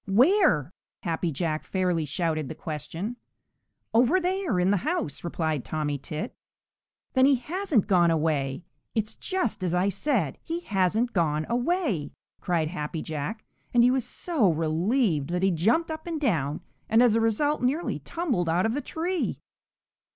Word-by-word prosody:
"Where?" 210 - +4 0.3
Happy 170 0 -1
Jack 155 +1 -2
fairly 180 -4 0
shouted 155 -1 -1
the - - -6
question. 165 - -5 0.8
"Over 250 +11 +4
there 365 - 0
in 180 +2 +3
the 205 - +3
house," 270 - -2
replied 160 -5 -1
Tommy 150 -2 -2
Tit. 155 - -5 0.8
"Then 260 0 +5
he 280 - +5
hasn't 300 - 0
gone 175 -4 +4
away! 150 -3 0 0.3
It's 215 -1 0
just 370 - -2
as 180 -1 0
I 185 +3 +2
said, 200 - -1
he 335 +1 -4
hasn't 210 - +1
gone 155 -4 +1
away!" 245 - 0 0.3
cried 165 -4 0
Happy 155 -2 -4
Jack, 160 +9 -4 0.3
and 240 - +7
he 250 - +5
was 260 -1 +1
so 270 - +1
relieved 165 - +1
that 180 +1 -1
he 195 - +4
jumped 230 - +2
up 315 +1 -6
and 330 -2 -2
down 160 - 0 0.3
and 225 +2 +5
as 240 -3 +5
a 230 - +3
result 290 +7 +1
nearly 275 +7 0
tumbled 260 - -1
out 175 +4 +2
of 225 - +1
the 290 - -1
tree. 345 +4 -2
195 Hz, 160 wpm, -27 LUFS, 160-265 Hz, 0.8 s, and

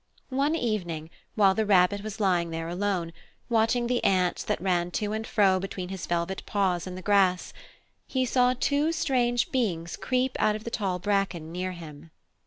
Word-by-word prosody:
One 280 +4 +1
evening, 175 - -2 0.2
while 195 -3 +5
the 220 - 0
Rabbit 200 -1 +3
was 215 +1 -7
lying 180 -4 +2
there 165 0 -4
alone, 175 -2 -2 0.4
watching 235 +1 +2
the 245 0 0
ants 185 -2 +2
that - - -1
ran 175 -1 0
to 210 0 -2
and 220 +1 -3
fro 195 -4 +3
between 185 -1 -5
his 190 -2 -6
velvet 175 +2 -1
paws 185 -4 0
in 180 - -6
the 185 - -8
grass, 195 -3 +2 0.5
he 260 -1 0
saw 250 0 +3
two 290 +4 +2
strange 245 -6 +1
beings 175 -10 -1
creep 255 0 -1
out 210 - +3
of 215 - -7
the 235 - -5
tall 195 -5 -1
bracken 190 -4 -1
near 185 +1 -3
him. 160 -2 -11
195 Hz, 180 wpm, -27 LUFS, 180-230 Hz, 0.5 s, while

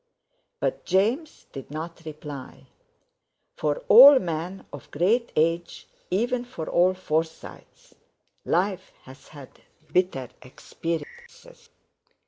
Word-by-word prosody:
But - - -2
James 230 - 0
did 135 -2 -9
not 165 +3 -7
reply. 145 -3 -9 0.9
For 150 -1 -2
all 270 +6 +10
men 175 -1 -4
of 145 - -10
great 220 +10 +1
age, 165 +2 -1 0.2
even 240 +6 0
for 245 -11 -8
all 180 +2 +2
Forsytes, 160 -2 -5 0.5
life 185 +1 -1
has 135 +1 -15
had 145 -4 -14 0.3
bitter 180 -9 0
experiences. 475 - -8
175 Hz, 100 wpm, -25 LUFS, 155-230 Hz, 0.9 s, all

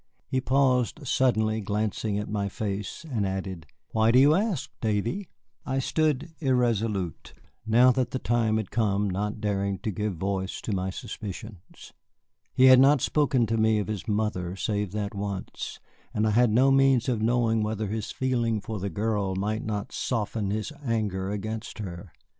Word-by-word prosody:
He 130 -1 -1
paused 130 +2 +1
suddenly 110 -4 +2
glancing 105 +1 -1
at 105 - -3
my 100 -1 -2
face, 100 - -4
and 120 -8 -1
added, 95 -3 -4 0.2
"Why 110 0 +3
do 120 - +5
you 140 +3 +7
ask, 180 - 0
Davy?" 115 - -1 0.3
I 135 - -2
stood 155 +3 0
irresolute, 115 - 0 0.3
now 120 +3 +6
that 130 0 0
the - - -2
time 115 -3 +1
had 110 -4 -4
come 105 -3 +1
not 105 +3 -2
daring 100 -2 -1
to 110 - -1
give 105 0 -2
voice 95 +2 -2
to 110 - -3
my 95 0 -1
suspicions. 100 0 -8 0.6
He 130 0 +4
had 130 -1 +9
not 135 0 +5
spoken 140 -5 +2
to 115 +1 -1
me 110 0 +3
of 105 -2 -2
his 105 0 -4
mother 105 -4 -1
save 105 -1 -2
that 105 -1 -3
once, 100 -2 -5 0.4
and 105 - +2
I 110 - +2
had 120 +2 +4
no 130 +5 +4
means 135 -3 +4
of 120 -4 0
knowing 115 -1 +2
whether 110 0 -1
his 105 +1 -3
feeling 120 -4 0
for 105 +1 -5
the 100 +2 -2
girl 100 0 -1
might 105 +3 -1
not 105 -2 -3
soften 110 -3 -2
his 110 +8 -3
anger 105 -6 -1
against 110 +2 -4
her. 90 -3 -7
110 Hz, 170 wpm, -27 LUFS, 100-125 Hz, 0.6 s, had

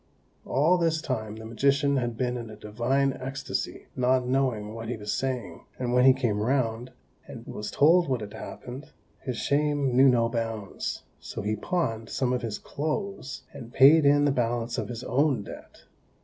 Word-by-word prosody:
All 160 +7 +3
this 165 -2 +1
time 110 -7 -3
the 110 0 -9
magician 140 +4 +2
had 120 -3 -2
been 125 0 -1
in 120 -2 -6
a 110 - -9
divine 120 +6 0
ecstasy, 135 +2 -4
not 125 0 +2
knowing 125 -5 0
what 115 0 -6
he 120 - -3
was 105 -1 -3
saying; 125 -10 -3
and 125 -1 -2
when 125 0 +5
he 135 - +9
came 120 -6 -1
round, 120 0 0 0.4
and - - -9
was 105 - -6
told 165 +2 +4
what 130 -3 0
had 105 0 -7
happened, 130 +6 -9 0.3
his 125 -3 -4
shame 145 -2 +1
knew 135 +1 +7
no 120 -2 +3
bounds, 115 -4 -4 0.2
so - - -6
he 105 +1 0
pawned 115 - -2
some 125 -2 0
of 125 - -1
his 110 -3 -3
clothes, 155 -2 -4
and 120 0 -10
paid 150 +4 +7
in 145 0 +5
the 145 - +3
balance 120 -2 -1
of - - -4
his 120 0 -6
own 140 -4 +1
debt. - - -12
125 Hz, 180 wpm, -27 LUFS, 115-140 Hz, 0.4 s, he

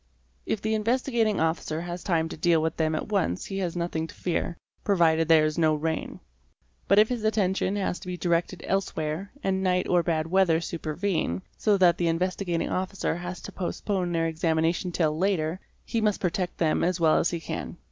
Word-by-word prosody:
If 210 - -2
the 220 0 0
Investigating 230 -1 +1
Officer 160 0 -1
has 175 0 -6
time 165 -3 +1
to - - -6
deal 165 0 +3
with 160 0 -1
them 155 -1 +1
at 155 - -4
once 185 - 0
he 195 - -4
has 180 -3 -2
nothing 170 -2 -2
to - - -13
fear, 170 -1 -2 0.3
provided 165 -5 +3
there 160 -2 +6
is 155 +2 -1
no 155 -2 +4
rain. 160 +1 -3 0.7
But 200 - +4
if 215 +1 +6
his 245 -3 -2
attention 200 -2 +1
has 195 -3 -1
to 185 - -11
be 180 0 -4
directed 175 0 0
elsewhere 185 -1 -2
and 190 0 0
night 180 -1 +1
or 175 -1 +3
bad 160 -2 0
weather 175 -1 +3
supervene, 165 - -2
so 210 -2 +2
that 175 -3 +4
the 175 - +1
Investigating 175 +1 -1
Officer 185 -1 -1
has 175 +1 -6
to - - -8
postpone 185 0 -2
their 165 -1 +1
examin 160 0 +1
ation 175 +2 0
till 155 -3 +1
later, 175 -1 0 0.3
he 230 - -1
must 210 -2 +1
protect 180 0 -2
them 160 -2 +1
as 180 0 +1
well 160 -2 +4
as - - +2
he 170 - -3
can. 170 - -5
175 Hz, 200 wpm, -27 LUFS, 160-195 Hz, 0.7 s, there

